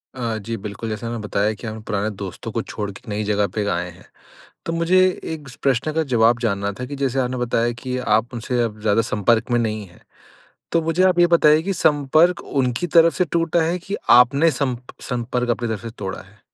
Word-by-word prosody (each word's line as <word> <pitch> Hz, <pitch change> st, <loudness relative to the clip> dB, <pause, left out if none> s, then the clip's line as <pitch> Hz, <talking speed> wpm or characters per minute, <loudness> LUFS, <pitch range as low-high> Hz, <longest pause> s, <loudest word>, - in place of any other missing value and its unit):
अ, 115 Hz, -3 st, -2 dB
जी 115 Hz, +2 st, -5 dB
बिल्कुल, 105 Hz, +2 st, -6 dB
जैसा 115 Hz, +2 st, -4 dB
मैं 120 Hz, -, -4 dB
बताया 105 Hz, +1 st, 0 dB
कि 110 Hz, +3 st, -9 dB
हम 110 Hz, 0 st, -6 dB
पुराने 105 Hz, 0 st, -1 dB
दोस्तों 95 Hz, -2 st, -6 dB
को -, -, -1 dB
छोड़ 105 Hz, -1 st, -5 dB
के 100 Hz, -, -13 dB
नई 105 Hz, +1 st, -2 dB
जगह 105 Hz, -1 st, +1 dB
पे 105 Hz, -2 st, 0 dB
आए 90 Hz, -1 st, -2 dB
हैं। 90 Hz, +1 st, -16 dB, 0.6 s
तो 165 Hz, -, -2 dB
मुझे 170 Hz, +3 st, +3 dB, 0.3 s
एक 150 Hz, -3 st, -8 dB, 0.2 s
प्रश्न 135 Hz, +2 st, +1 dB
का 160 Hz, 0 st, +1 dB
जवाब 115 Hz, +1 st, +4 dB
जानना 100 Hz, -3 st, -1 dB
था 125 Hz, -, -3 dB
कि 140 Hz, +3 st, -6 dB
जैसे 135 Hz, -1 st, -1 dB
आपने 125 Hz, 0 st, -1 dB
बताया 120 Hz, -1 st, 0 dB
कि 130 Hz, -1 st, -2 dB
आप 120 Hz, 0 st, +1 dB
उनसे 120 Hz, +1 st, -1 dB
अब 110 Hz, -2 st, -4 dB
ज़्यादा 110 Hz, +1 st, +3 dB
संपर्क 110 Hz, +3 st, +1 dB
में 120 Hz, -, +3 dB
नहीं 110 Hz, -2 st, -2 dB
है। 85 Hz, -, -20 dB, 0.7 s
तो 165 Hz, -, +2 dB
मुझे 165 Hz, +3 st, +1 dB
आप 185 Hz, -2 st, +3 dB
ये 175 Hz, -, +6 dB
बताइए 160 Hz, -2 st, +5 dB
कि 195 Hz, -, -1 dB
संपर्क 160 Hz, +1 st, +3 dB
उनकी 130 Hz, +3 st, -1 dB
तरफ़ 165 Hz, 0 st, +5 dB
से 180 Hz, -, +2 dB
टूटा 165 Hz, 0 st, +2 dB
है 170 Hz, +3 st, 0 dB
कि 195 Hz, +3 st, -5 dB, 0.2 s
आपने 140 Hz, +6 st, +4 dB
सम 135 Hz, -3 st, -1 dB, 0.3 s
संपर्क 125 Hz, 0 st, -1 dB
अपनी 120 Hz, 0 st, -1 dB
तरफ़ 110 Hz, -3 st, -4 dB
से 115 Hz, -, -6 dB
तोड़ा 95 Hz, -1 st, -5 dB
है? 100 Hz, +2 st, -18 dB
120 Hz, 220 wpm, -21 LUFS, 110-155 Hz, 0.7 s, ये